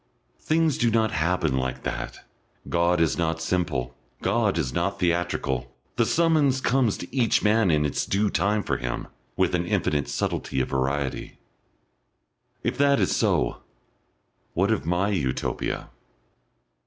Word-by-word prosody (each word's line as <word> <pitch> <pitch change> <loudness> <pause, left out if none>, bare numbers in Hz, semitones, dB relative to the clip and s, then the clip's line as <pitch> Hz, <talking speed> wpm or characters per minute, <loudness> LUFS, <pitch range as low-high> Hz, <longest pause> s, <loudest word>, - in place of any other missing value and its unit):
Things 160 -2 +1
do 120 - +3
not 110 -2 +2
happen 80 -2 +1
like 65 0 -3
that. 60 0 -4 0.5
God 85 +1 +2
is 85 +1 +1
not 80 -1 0
simple, 80 -8 -1 0.3
God 110 -5 +1
is 65 -7 -1
not - - -1
theatrical, 75 -8 -1 0.2
the - - +2
summons 155 -5 +3
comes 125 -4 +2
to 90 - -9
each 120 -4 +2
man 105 -1 +3
in 75 -2 +3
its 75 - -1
due 100 +1 +1
time 105 +1 +1
for - - -1
him, - - -4 0.3
with - - +2
an - - 0
infinite 70 -3 0
subtlety - - -2
of 65 - -1
variety.... 70 0 -2 1.3
If 125 - -2
that 140 -1 +4
is - - +2
so, - - +1 0.9
what 95 +5 +2
of 105 -7 -1
my 90 +4 +1
Utopia? 75 -11 -2
90 Hz, 140 wpm, -25 LUFS, 70-110 Hz, 1.3 s, that